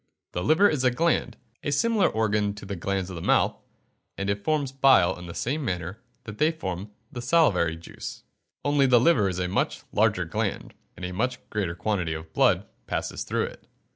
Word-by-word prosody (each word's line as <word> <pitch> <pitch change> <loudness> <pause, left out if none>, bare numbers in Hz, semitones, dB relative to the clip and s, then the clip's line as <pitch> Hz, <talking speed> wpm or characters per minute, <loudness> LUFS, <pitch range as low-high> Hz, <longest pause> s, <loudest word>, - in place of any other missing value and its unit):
The 90 - -3
liver 160 - +5
is 150 -8 0
a 130 - +5
gland 125 -4 0 0.3
a 145 - -1
similar 215 +8 +3
organ 105 -2 0
to 100 - -9
the 100 0 -4
glands 95 +1 -2
of - - -6
the 85 - -6
mouth - - +2 0.6
and 100 0 -1
it 100 0 -3
forms 150 -4 0
bile 135 -9 +5
in 90 0 -10
the 85 - -8
same 145 +5 -1
manner 95 -1 -3 0.2
that 105 -1 -9
they 155 - +4
form 95 - -5 0.2
the 120 - -6
salivary 120 - +3
juice. 80 - -9 0.4
Only 145 -1 +4
the 125 -2 +6
liver 120 - +4
is 90 - -4
a 90 -1 -1
much 95 - -1
larger - - +2
gland, - - -3 0.2
and 90 - -5
a 90 - -4
much 125 +6 -1
greater 95 -6 -1
quantity 90 -4 -1
of 80 0 -9
blood - - +3 0.2
passes - - -3
through - - -1
it. - - -8
105 Hz, 200 wpm, -26 LUFS, 90-135 Hz, 0.6 s, the